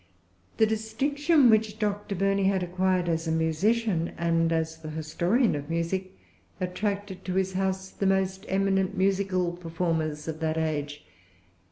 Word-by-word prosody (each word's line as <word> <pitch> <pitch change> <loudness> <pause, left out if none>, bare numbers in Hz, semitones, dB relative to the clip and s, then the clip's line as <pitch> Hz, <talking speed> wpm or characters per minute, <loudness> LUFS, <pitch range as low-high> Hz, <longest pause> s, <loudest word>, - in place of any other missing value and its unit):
The 220 - +5
distinction 265 +6 +2
which 220 -1 +2
Dr. 205 -1 -2
Burney 195 +1 +1
had 190 -1 +2
acquired 180 0 0
as 165 0 -1
a - - 0
musician, 170 +3 +1
and 165 -1 +1
as 160 0 -1
the 155 -1 -7
historian 170 - +1
of 145 +1 -5
music, 185 +3 -2 0.4
attracted 195 +1 -3
to 185 - -2
his 190 0 0
house 190 0 -1
the 195 - -1
most 190 0 +1
eminent 195 0 +1
musical 190 -2 +1
performers 165 -3 -2
of 160 -1 -4
that 160 0 -1
age. 150 -2 -2
185 Hz, 145 wpm, -27 LUFS, 165-200 Hz, 0.4 s, The